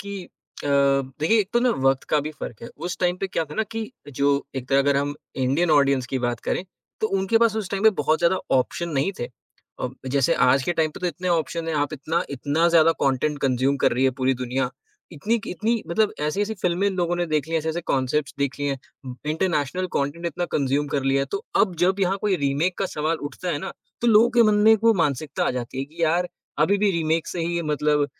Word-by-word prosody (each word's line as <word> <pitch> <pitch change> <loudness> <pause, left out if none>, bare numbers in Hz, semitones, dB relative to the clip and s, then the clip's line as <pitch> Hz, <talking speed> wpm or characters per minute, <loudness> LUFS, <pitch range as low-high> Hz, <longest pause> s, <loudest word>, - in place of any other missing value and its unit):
कि 200 -1 -6 0.4
अ, - - -2 0.5
देखिए 190 +9 +3
एक 195 - -3
तो 240 - +3
ना 250 0 +3
वक़्त 135 0 +3
का 150 - +4
भी 155 - -3
फ़र्क 115 - -6
है। - - -6 0.2
उस 180 - -3
टाइम 180 -1 +1
पे 195 - 0
क्या 175 -3 -1
था 150 -1 -10
ना 220 - +1
कि 225 - -3 0.4
जो 140 - +3 0.3
एक 130 0 -5
तरह 135 - +4
अगर 140 0 +3
हम 145 +1 -1 0.3
इंडियन 155 +7 +2
ऑडियंस 140 -3 +3
की 130 - +1
बात 120 -2 -2
करें, - - -2 0.4
तो 220 - +2
उनके 195 +4 +2
पास 230 -2 +3
उस 210 -4 -3
टाइम 195 -1 -2
पे 220 - +7
बहुत 155 +2 +2
ज़्यादा 175 +2 +3 0.2
ऑप्शन 170 +6 -1
नहीं 140 - +1
थे। 120 - -2 0.6
अ, 125 - -1 0.3
जैसे 140 -2 +3
आज 135 +1 +4
के 175 - 0
टाइम 160 -1 +2
पे - - -11
तो 180 - -1
इतने 180 +2 -3
ऑप्शन 165 0 -1
हैं, 160 - -1
आप 145 0 0
इतना-इतना 155 +1 0
ज़्यादा 165 -1 +5
कंटेंट 140 +2 +1
कंज़्यूम 130 +1 +2
कर - - +4
रही 125 +2 +1
है 130 - +4
पूरी 130 +1 +2
दुनिया। 125 +1 -1 0.4
इतनी 215 +10 -1
इतनी 220 +5 -1
मतलब 205 +5 +2
ऐसी-ऐसी 200 +9 -1
फिल्में 180 +2 +1
इन 195 - -3
लोगों 175 -1 0
ने 175 0 -1
देख 155 -1 -1
ली - - -6
हैं, - - +4
ऐसे-ऐसे 160 +2 -2
कांसेप्ट्स 135 +2 0
देख 140 -1 -1
लिए 145 0 0
हैं, 135 - -3 0.5
इंटरनेशनल 160 0 0
कंटेंट 145 +5 -2
इतना 175 +1 -2
कंज़्यूम 140 +1 +1
कर 140 - 0
लिया 135 0 +2
है - - -3
तो 200 - -3 0.2
अब 185 -4 -8
जब 190 +2 +1
यहाँ 190 0 +2
कोई 205 -3 +1
रीमेक 155 +7 0
का 195 - 0
सवाल 155 +2 0
उठता 180 - -5
है 145 - -1
ना, 190 - -6 0.3
तो 240 - 0
लोगों 230 +1 +6
के - - +9
मन - - +3
में 220 - +8
वो 230 - +6
एक 225 - +2
मानसिकता 145 -2 0
आ - - +2
जाती 120 +2 -7
है 135 - -1
कि 160 +4 -8
यार, 170 +2 +2 0.3
अभी 200 +6 +3
भी 205 0 +3
रीमेक 165 -2 0
से 175 - -4
ही 170 0 -1
मतलब, 150 0 +2
160 Hz, 240 wpm, -24 LUFS, 140-185 Hz, 0.6 s, के